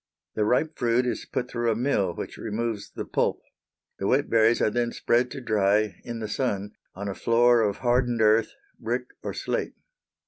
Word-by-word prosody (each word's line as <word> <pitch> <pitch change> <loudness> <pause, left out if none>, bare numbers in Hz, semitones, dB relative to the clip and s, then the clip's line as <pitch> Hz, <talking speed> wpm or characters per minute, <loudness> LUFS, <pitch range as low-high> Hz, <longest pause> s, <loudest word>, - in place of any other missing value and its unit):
The 105 - 0
ripe 155 +8 +1
fruit 120 +1 +2
is 125 - -3
put 125 - -1
through 120 -1 -1
a 110 - +2
mill 105 -8 0
which - - -6
removes 110 -1 -3
the - - -6
pulp. - - 0 0.6
The 95 - -1
wet 140 +2 +1
berries 115 +1 +4
are 110 - +2
then 120 0 0
spread 120 +1 +1
to 135 - -7
dry 105 -3 +1
in 120 -1 -5
the 110 - -4
sun 105 -3 -2 0.2
on 100 +2 -5
a 100 - -2
floor 120 +2 +4
of 105 -2 0
hardened 120 -1 +2
earth, 110 0 +4 0.3
brick - - -3
or - - -5
slate. - - -2
115 Hz, 185 wpm, -26 LUFS, 105-120 Hz, 0.6 s, berries